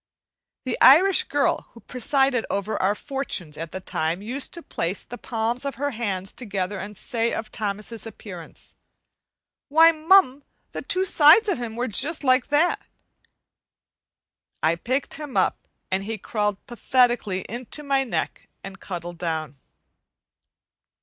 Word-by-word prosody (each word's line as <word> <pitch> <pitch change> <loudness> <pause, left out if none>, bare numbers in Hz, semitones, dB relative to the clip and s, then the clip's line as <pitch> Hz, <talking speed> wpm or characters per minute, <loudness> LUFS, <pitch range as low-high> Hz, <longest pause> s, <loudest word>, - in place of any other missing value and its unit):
The 255 - -2
Irish 355 +8 +7
girl 290 -1 0
who 230 - -13
presided 255 0 +1
over 200 +2 -2
our 200 +2 +2
fortunes 210 - -3
at 165 0 -6
the 190 - -5
time 170 0 -2
used 260 +6 -2
to 340 - -8
place 170 +4 -3
the 245 - -9
palms 230 +2 -2
of 280 -2 -3
her 285 +3 -2
hands 200 -5 -2
together 200 -4 -4
and 205 0 -8
say 230 -1 -1
of 220 - -5
Thomas's 210 +1 -4
appearance, 185 -6 -11 0.9
"Why, 325 +3 +7
mum, 315 -4 +4 0.3
the - - -5
two 375 +1 +1
sides 340 +5 +6
of 365 -11 -1
'im 225 -2 -5
were 245 +2 -2
just 285 +9 0
like 255 -1 +3
that." 300 +4 +2 1.8
I 160 +2 +3
picked 255 - -2
him 295 -4 -5
up, - - 0 0.2
and 190 +1 0
he 220 +2 -4
crawled 210 -1 -2
pathetically 240 -5 +1
into 250 +8 -5
my 275 -1 +1
neck 255 - -4
and 195 0 -9
cuddled 175 -2 -7
down. 155 -5 -3
235 Hz, 145 wpm, -24 LUFS, 195-275 Hz, 1.8 s, Irish